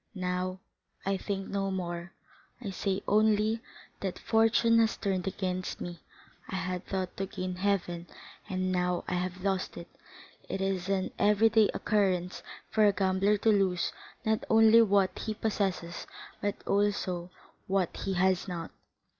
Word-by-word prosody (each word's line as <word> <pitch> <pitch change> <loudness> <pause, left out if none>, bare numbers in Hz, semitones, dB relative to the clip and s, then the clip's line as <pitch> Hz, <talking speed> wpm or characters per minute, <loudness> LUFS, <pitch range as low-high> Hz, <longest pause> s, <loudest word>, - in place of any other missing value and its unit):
Now, 185 0 -2 0.5
I 195 0 +1
think 195 0 -3
no 195 -1 -1
more; 175 -1 -4 0.5
I 215 -6 -5
say 195 +1 -2
only 215 +1 +3 0.4
that 190 -2 -3
fortune 230 +1 +4
has 225 -1 +2
turned 190 -2 -1
against 185 -1 -2
me—I 175 +2 -10
had 185 -1 -3
thought 185 -2 -3
to 195 - -2
gain 185 -1 -4
heaven, 180 -3 -1 0.4
and 185 0 -1
now 180 -1 0
I - - -2
have 180 +1 -2
lost 195 -2 -1
it. 170 0 -8 0.6
It 195 - -2
is 195 -1 -1
an 190 -1 0
every 210 +2 +5
day 220 -1 +5
occurrence 185 -4 +1 0.3
for 215 -1 +5
a - - +6
gambler 195 +2 +2
to 220 - +2
lose 190 -4 +2 0.3
not 220 0 +1
only 225 +1 +7
what 200 -4 +3
he 215 -1 -3
possesses 195 -6 -2 0.3
but 205 -1 0
also 195 -3 0 0.4
what 190 -2 0
he 195 - -2
has 185 +1 +2
not." 170 -3 -5
190 Hz, 145 wpm, -30 LUFS, 180-205 Hz, 0.6 s, only